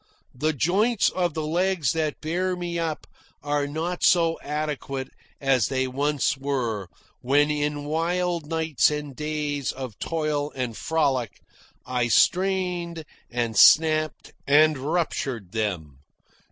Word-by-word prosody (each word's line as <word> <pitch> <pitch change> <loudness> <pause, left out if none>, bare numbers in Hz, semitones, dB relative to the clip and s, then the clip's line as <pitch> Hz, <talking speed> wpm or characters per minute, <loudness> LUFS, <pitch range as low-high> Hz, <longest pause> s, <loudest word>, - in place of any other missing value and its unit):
The 155 +5 0
joints 195 - +2
of 175 -4 -1
the 155 -1 -2
legs 170 -3 +1
that 155 -2 -2
bear 180 +4 -1
me 175 -1 -3
up 160 -2 -3 0.4
are 145 0 0
not 165 +4 -3
so 165 -2 +4
adequate 145 -3 -4 0.3
as 135 -6 +2
they 130 -1 0
once 140 +3 0
were, 125 -8 -2 0.3
when, 145 +4 +3
in 145 0 -2
wild 170 +1 -1
nights 160 -3 +2
and 150 -2 -5
days 150 -2 -2
of 130 -6 -8
toil 150 -3 -1
and 125 -4 -3
frolic, 135 -7 -1 0.5
I 125 -1 0
strained 180 - +1 0.2
and 120 -2 -2
snapped 155 - +4
and 155 +2 +5
ruptured 135 - -2
them. 90 -11 -3
150 Hz, 125 wpm, -25 LUFS, 135-165 Hz, 0.5 s, and